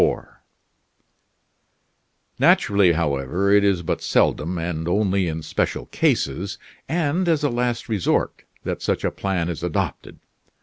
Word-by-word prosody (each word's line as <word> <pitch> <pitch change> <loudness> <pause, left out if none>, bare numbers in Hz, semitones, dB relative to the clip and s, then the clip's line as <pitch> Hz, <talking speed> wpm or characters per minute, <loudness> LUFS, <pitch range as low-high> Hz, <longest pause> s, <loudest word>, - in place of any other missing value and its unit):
Naturally, 100 -4 +4
however, 80 +4 0
it 100 0 +5
is 95 -3 +2
but - - -2
seldom, 85 +5 +1
and 80 -1 -3
only 95 0 +1
in 80 -1 -4
special - - -2
cases, 90 +9 0 0.3
and 170 +3 0
as 155 -3 +2
a 145 - +2
last 120 -1 -1
resort, 105 -6 0 0.2
that - - -3
such - - -1
a - - +1
plan 95 -4 -2
is 85 -3 -4
adopted. 85 -2 -3
95 Hz, 125 wpm, -22 LUFS, 85-110 Hz, 0.3 s, it